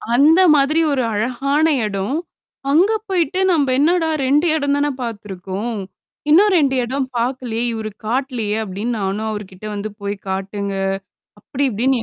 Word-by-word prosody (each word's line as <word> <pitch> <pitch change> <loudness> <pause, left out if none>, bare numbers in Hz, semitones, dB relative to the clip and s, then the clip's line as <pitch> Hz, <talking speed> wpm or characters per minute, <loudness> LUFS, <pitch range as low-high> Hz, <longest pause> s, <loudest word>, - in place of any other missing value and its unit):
அந்த 310 +6 +6 0.2
மாதிரி 290 +3 +3
ஒரு 265 -3 +1
அழகான 270 +8 +1 0.2
எடம். 200 +6 -2 0.6
அங்க 355 +9 +4 0.2
போயிட்டு 370 -1 0
நம்ப 300 -5 +2
என்னடா 325 +2 +3 0.2
2 290 +5 +3
எடந்தானே 285 -1 +1
பாத்துருக்கோம். 210 -1 -5 0.5
இன்னும் 390 +7 +6
2 275 -4 +2
எடம் 265 +3 -1
பாக்கலயே! 240 -1 -1
இவரு 220 -1 -4
காட்டலயே! 240 -3 -1
அப்பிடின்னு, 215 +4 -3
நானும் 200 +3 -2
அவருக்கிட்ட 205 -2 -8
வந்து 205 +1 -4
போய்க் 200 0 -4
காட்டுங்க! 195 +1 -3 0.7
அப்பிடி 280 +5 -3
இப்பிடின்னு 245 +3 +1
245 Hz, 130 wpm, -19 LUFS, 210-285 Hz, 0.7 s, அந்த